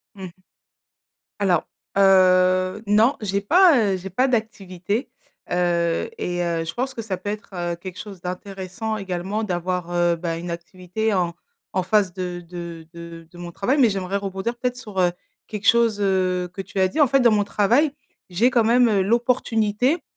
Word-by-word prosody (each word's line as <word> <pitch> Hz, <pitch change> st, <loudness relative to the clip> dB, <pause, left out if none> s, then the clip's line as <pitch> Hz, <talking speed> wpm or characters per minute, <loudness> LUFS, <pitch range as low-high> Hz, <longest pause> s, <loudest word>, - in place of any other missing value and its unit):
Mmh 190 Hz, -, -8 dB
mh. -, -, -9 dB, 1.1 s
Alors, 180 Hz, -5 st, +1 dB, 0.3 s
heu, 185 Hz, 0 st, +4 dB
non, 220 Hz, +6 st, +4 dB
j'ai 200 Hz, -1 st, -1 dB
pas, 345 Hz, -, +5 dB, 0.2 s
heu, -, -, -1 dB
j'ai 190 Hz, +1 st, -7 dB
pas 255 Hz, +9 st, +1 dB
d'activité, 210 Hz, -2 st, -2 dB, 0.4 s
heu 170 Hz, -, +1 dB
et 175 Hz, 0 st, -2 dB
heu 170 Hz, -1 st, -1 dB
je 165 Hz, -, -5 dB
pense 260 Hz, +2 st, -3 dB
que 230 Hz, -, -5 dB
ça 195 Hz, -4 st, -4 dB
peut 205 Hz, -, -5 dB
être, 210 Hz, +1 st, -6 dB
heu, 175 Hz, -1 st, -2 dB
quelque 180 Hz, +1 st, -9 dB
chose 195 Hz, -4 st, -9 dB
d'intéressant 190 Hz, +3 st, -5 dB
également 195 Hz, +2 st, -3 dB
d'avoir, 180 Hz, -2 st, -2 dB
heu, 175 Hz, -1 st, +2 dB
bah, 165 Hz, -1 st, -3 dB
une 170 Hz, 0 st, -5 dB
activité 185 Hz, +5 st, -3 dB
en 175 Hz, -3 st, 0 dB, 0.4 s
en 185 Hz, -1 st, 0 dB
face 195 Hz, -1 st, +2 dB
de 180 Hz, -1 st, -5 dB
de 170 Hz, -2 st, -8 dB
de 170 Hz, -1 st, -10 dB
de 175 Hz, -, -14 dB
mon 175 Hz, 0 st, -7 dB
travail, 255 Hz, -, 0 dB
mais 240 Hz, -4 st, +6 dB
j'aimerais 195 Hz, 0 st, -2 dB
rebondir 195 Hz, +4 st, -3 dB
peut-être 250 Hz, 0 st, -2 dB
sur, 210 Hz, -6 st, -6 dB
heu, 175 Hz, -1 st, +3 dB, 0.4 s
quelque 210 Hz, -2 st, -4 dB
chose, 230 Hz, -3 st, +4 dB
heu, 185 Hz, -2 st, +1 dB
que 195 Hz, -, -5 dB
tu 195 Hz, -, -6 dB
as 190 Hz, -, +4 dB
dit. 310 Hz, -, -4 dB
En 290 Hz, -, +6 dB
fait, 275 Hz, +2 st, +3 dB
dans 235 Hz, -2 st, +5 dB
mon 205 Hz, -1 st, +3 dB
travail, 240 Hz, +10 st, +2 dB, 0.4 s
j'ai 215 Hz, +8 st, +3 dB
quand 240 Hz, -2 st, +3 dB
même, 240 Hz, +1 st, +4 dB
heu, 200 Hz, -3 st, +2 dB
l'opportunité, 235 Hz, -, +1 dB
190 Hz, 185 wpm, -22 LUFS, 180-220 Hz, 1.1 s, mais